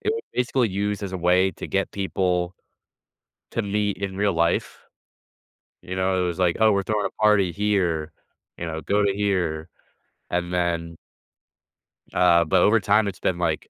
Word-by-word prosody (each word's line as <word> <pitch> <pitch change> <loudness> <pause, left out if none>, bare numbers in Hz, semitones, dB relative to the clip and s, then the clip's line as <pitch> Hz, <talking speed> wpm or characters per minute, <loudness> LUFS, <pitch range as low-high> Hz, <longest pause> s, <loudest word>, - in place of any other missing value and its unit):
it 430 - 0
was 455 - -4
basically 125 -1 +1
used 100 +2 -2
as 95 -2 -5
a - - -2
way 90 +2 +3
to - - -8
get 95 0 -1
people 90 -2 -1 1.0
to 115 - -1
meet 105 -1 -1
in 100 -1 -4
real 100 0 +1
life. 85 0 0 1.0
You 95 +1 -6
know, 95 0 +1
it - - 0
was 85 0 -3
like, 90 -2 +2
"Oh, 110 -1 +5
we're 100 -1 +1
throwing 105 0 0
a - - -8
party 105 -4 +4
here," 90 -5 0 0.5
you - - -4
know, 80 -1 -4
"go 100 +5 +1
to 100 -1 +2
here," 90 -6 -1 0.6
and 90 0 -2
then 85 -2 -1 1.2
uh, 85 -1 +5
but 90 +2 +3
over 110 +4 +5
time, 105 +1 +2
it's 95 - -5
been 90 - 0
like, 85 -3 -2
95 Hz, 175 wpm, -24 LUFS, 85-105 Hz, 1.2 s, Oh